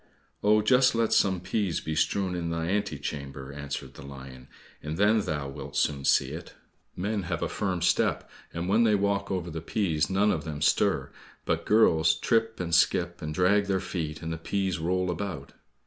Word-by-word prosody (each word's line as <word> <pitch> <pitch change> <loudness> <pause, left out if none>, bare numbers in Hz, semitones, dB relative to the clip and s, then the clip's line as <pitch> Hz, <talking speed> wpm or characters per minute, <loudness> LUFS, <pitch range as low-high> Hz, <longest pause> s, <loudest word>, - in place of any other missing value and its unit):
"Oh, 105 +1 +4
just 125 +3 +4
let 115 -1 +1
some 95 -3 +3
peas 95 -1 -1
be 80 - -4
strewn 95 +4 0
in 85 -1 -3
thy 85 0 -2
ante 100 -3 -1
chamber," 70 -1 -6
answered 70 -1 -6
the - - -12
lion, 65 -2 -10 0.3
"and 75 +2 -5
then 105 +3 +4
thou 75 -8 -3
wilt 70 +1 -7
soon 70 -2 0
see 65 - +3
it. 85 +3 -8 0.4
Men 100 +3 -2
have 85 -2 -2
a - - 0
firm 95 -4 -2
step, - - +1 0.2
and 85 +1 -4
when 110 +5 +4
they 110 -2 +4
walk 100 0 0
over 90 -3 -3
the 80 0 -5
peas 80 -4 0
none 100 +2 +3
of 75 - -2
them 75 -2 -5
stir, 75 - +2 0.3
but - - -1
girls 80 -7 +4
trip 115 +6 0
and 85 -2 -3
skip, 85 0 +2
and 75 - -4
drag 100 +5 +2
their 95 -1 +1
feet, 80 -5 -4
and 80 0 -3
the 80 - -6
peas 95 0 -1
roll 90 +2 0
about." 85 -6 -5
85 Hz, 195 wpm, -27 LUFS, 75-100 Hz, 0.4 s, Oh